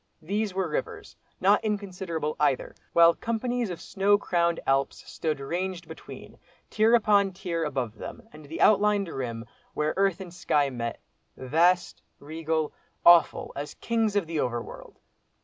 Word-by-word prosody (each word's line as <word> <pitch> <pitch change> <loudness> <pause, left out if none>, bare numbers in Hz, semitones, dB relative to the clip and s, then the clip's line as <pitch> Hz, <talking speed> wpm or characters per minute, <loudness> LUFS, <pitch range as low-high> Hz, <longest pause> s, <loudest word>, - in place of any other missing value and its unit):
These 200 +3 -2
were 190 -2 0
rivers—not 415 - -1
inconsiderable 185 -7 -3
either—while 160 +4 +3
companies 235 +1 -2
of 175 - -5
snow 205 +1 +2
crowned 170 -4 0
Alps 135 0 0
stood 155 -3 -3
ranged 175 +5 -4
between, - - -11 0.3
tier 225 +2 +4
upon 205 -4 +3
tier 175 -3 -3
above 130 -7 -3
them 235 -1 -9
and 150 0 -12
the 155 +3 -6
outlined 205 -1 +4
rim, 120 -5 -5 0.3
where 150 0 0
earth 195 -2 +2
and 180 -3 -9
sky 145 -5 +1
met, 115 -2 -4 0.4
vast, 170 +7 +2 0.2
regal, 160 +1 -3 0.3
awful, 170 -1 +5
as 145 +1 -6
Kings 225 -3 0
of 200 -4 +2
the 160 -1 -3
Over 120 -3 0
world! - - -12
170 Hz, 140 wpm, -27 LUFS, 150-205 Hz, 0.4 s, awful